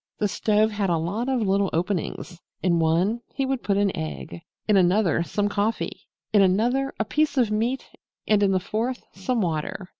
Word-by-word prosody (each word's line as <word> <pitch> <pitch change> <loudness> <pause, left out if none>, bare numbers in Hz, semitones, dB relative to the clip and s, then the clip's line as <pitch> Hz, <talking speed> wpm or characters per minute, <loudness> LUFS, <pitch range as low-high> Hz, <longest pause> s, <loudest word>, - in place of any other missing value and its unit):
The 210 - +1
stove 215 +2 +2
had 205 -2 -1
a 170 - +2
lot 200 +10 -2
of 260 -3 +1
little 195 -1 +2
openings. 175 0 -3 0.2
In 170 -2 +3
one 175 +8 +2
he 270 - 0
would 265 -1 -1
put 200 -1 0
an 200 -1 +1
egg, 75 +2 -6 0.3
in 210 - +4
another 185 -1 +3
some 205 +4 -1
coffee, 205 +2 -2 0.3
in 205 - +6
another 240 +9 +2
a 220 - +1
piece 300 +4 0
of 235 -4 +3
meat 235 +5 -1 0.4
and 210 -1 +4
in 200 -1 +3
the 190 - +2
fourth 225 +7 -3
some 225 +5 -1
water. 175 +2 -3
205 Hz, 185 wpm, -24 LUFS, 180-225 Hz, 0.4 s, in